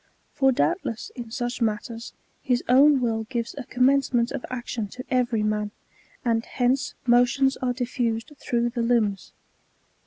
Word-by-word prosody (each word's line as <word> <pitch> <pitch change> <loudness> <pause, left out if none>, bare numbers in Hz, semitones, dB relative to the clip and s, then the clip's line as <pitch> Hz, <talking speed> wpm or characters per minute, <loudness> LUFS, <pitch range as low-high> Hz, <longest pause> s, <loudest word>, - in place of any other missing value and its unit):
For 270 -2 +3
doubtless, 260 - -1
in 240 -2 -7
such 240 +1 -3
matters, 225 +1 -2 0.3
his 250 -2 0
own 270 +2 +6
will 225 -2 0
gives 235 0 -3
a 280 -3 -6
com 250 +1 0
mencement 260 -3 +3
of 275 -3 -4
action 240 -3 -4
to 250 +6 -9
every 245 -4 +1
man; 210 0 0 0.6
and 230 -1 +2
hence 260 +3 0
motions 245 +3 +4
are 250 -1 -1
diffused 240 0 -2
through 240 0 0
the 240 0 -2
limbs. 225 -5 +1
245 Hz, 150 wpm, -25 LUFS, 230-255 Hz, 0.6 s, own